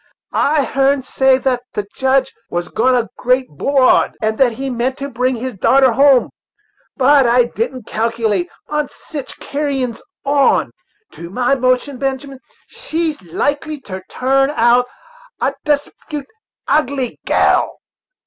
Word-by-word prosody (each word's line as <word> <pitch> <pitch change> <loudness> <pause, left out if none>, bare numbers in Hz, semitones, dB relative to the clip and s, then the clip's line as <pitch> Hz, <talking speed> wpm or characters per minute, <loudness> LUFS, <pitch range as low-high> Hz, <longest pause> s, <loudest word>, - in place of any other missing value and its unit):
I 295 0 +2
heern 270 +1 +1
say 265 0 +3
thats 255 -2 -1
the 205 - -3
Judge 265 0 +1 0.2
was 175 -1 -3
gone 255 +3 +2
a 240 -2 0
great 255 +1 +2
'broad, 260 - +2
and 220 0 0
that 255 -3 +4
he 270 +4 -5
meant 255 +1 -1
to 280 - -4
bring 255 +1 0
his 250 +2 -4
darter 260 +6 +4
hum, 270 +1 +4 0.7
but 275 -1 +5
I 245 +1 +5
didn't 240 +1 -4
calculate 220 -4 -1 0.2
on 300 -1 -2
sich 290 -4 -9
carrins 275 -5 -2 0.2
on. 280 -1 +3 0.4
To 170 - -9
my 245 +7 +1
notion, 255 +1 0
Benjamin, 270 0 -3 0.3
she's 320 -2 -3
likely 285 - -2
to 190 -5 -7
turn 270 +1 +2
out 240 +1 +4 0.5
a 270 - 0
desp'ut 295 0 -2 0.4
ugly 275 -4 0
gal." - - +2
260 Hz, 135 wpm, -17 LUFS, 240-275 Hz, 0.7 s, but